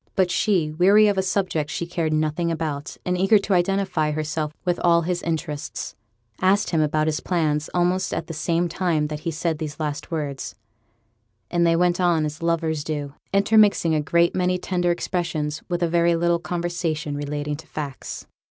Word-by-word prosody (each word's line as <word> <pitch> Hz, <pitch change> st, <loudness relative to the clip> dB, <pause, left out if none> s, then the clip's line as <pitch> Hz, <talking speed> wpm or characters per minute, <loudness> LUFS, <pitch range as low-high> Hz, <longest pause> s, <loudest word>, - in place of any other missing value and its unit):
But 185 Hz, -2 st, +2 dB
she, 180 Hz, -8 st, +1 dB
weary 195 Hz, +7 st, +5 dB
of 200 Hz, -2 st, +1 dB
a -, -, +4 dB
subject 185 Hz, -5 st, -1 dB
she 170 Hz, -, -3 dB
cared 170 Hz, -2 st, -2 dB
nothing 155 Hz, +2 st, 0 dB
about, 155 Hz, -1 st, -4 dB
and 180 Hz, -, 0 dB
eager 195 Hz, +4 st, +5 dB
to 200 Hz, 0 st, -1 dB
identify 180 Hz, -3 st, +1 dB
herself 155 Hz, 0 st, -2 dB
with 175 Hz, -1 st, 0 dB
all 170 Hz, -1 st, +4 dB
his 175 Hz, +1 st, -1 dB
interests, 160 Hz, -2 st, -4 dB, 0.5 s
asked 195 Hz, +3 st, +3 dB
him 165 Hz, -3 st, +2 dB
about 155 Hz, 0 st, +1 dB
his 155 Hz, 0 st, 0 dB
plans 155 Hz, -4 st, 0 dB
almost 180 Hz, +1 st, +1 dB
at -, -, -2 dB
the 165 Hz, -, -7 dB
same 170 Hz, +2 st, 0 dB
time 165 Hz, -3 st, 0 dB
that 150 Hz, -1 st, -4 dB
he 160 Hz, -, -3 dB
said 165 Hz, 0 st, -2 dB
these 150 Hz, -1 st, -5 dB
last 150 Hz, -2 st, -3 dB
words; 145 Hz, -5 st, -4 dB, 1.0 s
and 170 Hz, -1 st, +3 dB
they 165 Hz, -, +4 dB
went 175 Hz, +1 st, +2 dB
on 170 Hz, -3 st, +3 dB
as 155 Hz, +2 st, -5 dB
lovers 160 Hz, -2 st, 0 dB
do, 145 Hz, -2 st, -4 dB, 0.2 s
intermixing 200 Hz, -4 st, +4 dB
a 155 Hz, -, +2 dB
great 170 Hz, +3 st, +2 dB
many 180 Hz, 0 st, +1 dB
tender 180 Hz, -1 st, -1 dB
expressions 165 Hz, -3 st, -2 dB
with 175 Hz, 0 st, -1 dB
a -, -, +3 dB
very 170 Hz, 0 st, +3 dB
little 170 Hz, 0 st, +2 dB
conversation 170 Hz, -4 st, -2 dB
relating 145 Hz, 0 st, -3 dB
to 160 Hz, +1 st, -13 dB
facts. 145 Hz, -4 st, -6 dB
170 Hz, 180 wpm, -23 LUFS, 155-180 Hz, 1.0 s, weary